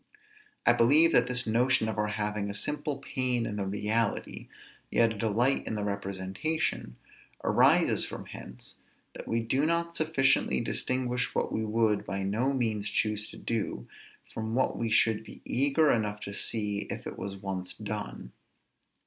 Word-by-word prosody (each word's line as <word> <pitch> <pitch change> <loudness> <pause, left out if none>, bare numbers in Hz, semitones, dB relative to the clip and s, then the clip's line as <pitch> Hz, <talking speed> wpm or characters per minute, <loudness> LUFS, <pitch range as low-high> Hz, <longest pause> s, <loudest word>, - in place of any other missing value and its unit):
I 120 - +6
believe 145 +8 +5
that 125 -3 +4
this 125 -1 +3
notion 120 +1 +2
of 110 -1 -3
our 105 - +1
having 105 -1 -2
a 100 - -4
simple 150 +4 -1
pain 130 -3 -1
in 105 - -4
the 100 -2 -2
reality, 105 +2 -1 0.4
yet 115 -1 +3
a - - -9
delight 115 +6 +1
in 110 - -2
the 105 - -2
representation, 100 - -2 0.5
arises - - +4
from - - -6
hence, - - -10 0.4
that - - -8
we 115 0 0
do 130 +5 0
not 170 +1 0
sufficiently 135 - +2
distinguish 125 -1 -1
what - - 0
we 110 - -1
would 110 -1 +1
by 95 +2 -3
no 110 +8 0
means 110 -6 -1
choose 105 -1 0
to - - -10
do, 115 -3 -3 0.5
from 110 0 -3
what 130 - +1
we 115 - -2
should 110 0 +3
be 110 - -13
eager 145 +3 +3
enough 105 -2 0
to 100 - -6
see 105 -1 0
if - - -5
it - - -7
was 100 0 -5
once 95 -2 -5
done. 105 - -5
110 Hz, 165 wpm, -29 LUFS, 105-130 Hz, 0.5 s, I